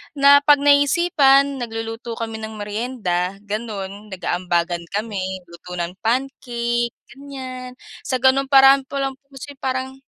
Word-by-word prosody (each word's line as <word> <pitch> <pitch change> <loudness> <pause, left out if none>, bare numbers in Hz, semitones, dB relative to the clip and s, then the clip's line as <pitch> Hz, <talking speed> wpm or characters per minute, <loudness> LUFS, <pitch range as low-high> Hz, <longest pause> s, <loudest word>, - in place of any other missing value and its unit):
na 280 0 +7
'pag 290 0 +5
naiisipan, 285 -1 +4
nagluluto 225 0 -5
kami 225 -1 -5
ng 220 0 -7
merienda 205 -4 -2
gano'n, 205 -1 -5
nag-aambagan 175 -2 -1
kami, 190 -4 -3
luto 180 +1 -10
ng 175 +2 -5
pancake, 240 -1 -1 0.2
ganyan. 260 -2 -8 0.3
Sa 260 -2 -2
ganung 270 +1 +4
paraan 270 0 +6
pa 275 -1 -3
lang 270 0 -4
po 275 - -45
kasi 270 +2 -8
parang 260 0 -3
240 Hz, 130 wpm, -21 LUFS, 205-270 Hz, 0.3 s, na